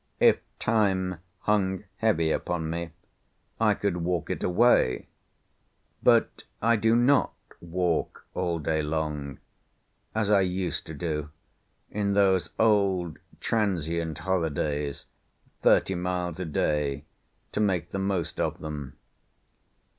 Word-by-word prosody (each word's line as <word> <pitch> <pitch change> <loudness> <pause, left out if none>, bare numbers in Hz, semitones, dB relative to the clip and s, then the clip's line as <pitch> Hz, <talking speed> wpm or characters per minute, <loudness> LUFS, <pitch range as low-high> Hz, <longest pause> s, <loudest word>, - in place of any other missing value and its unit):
If - - +6 0.2
Time 95 -5 +1 0.2
hung 95 -2 +1
heavy 85 -8 +2
upon 80 -2 -1
me, 85 0 -3 0.7
I - - +4
could 90 - -1
walk 85 -1 -1
it - - -3
away; 90 - +3 0.9
but - - +3 0.2
I 115 +1 +3
do 110 +1 +3
not 125 +4 +3 0.2
walk 85 -1 -1
all 90 -2 -1
day 80 0 0
long, 75 -2 -3 0.8
as 105 -2 +1
I 100 -2 +6
used 90 -1 -2
to 80 - -7
do 75 -2 -3 0.6
in 100 -1 0
those 95 -5 +3
old 100 -6 +2 0.2
transient 85 -7 -1
holidays, 75 -5 -1 0.6
thirty 95 - +4
miles 90 -1 -2
a 90 - -2
day, 75 -2 0 0.5
to - - -2
make 95 -6 +1
the 100 - -2
most 95 -3 -1
of - - 0
them. 75 -3 -7
90 Hz, 115 wpm, -27 LUFS, 80-100 Hz, 0.9 s, If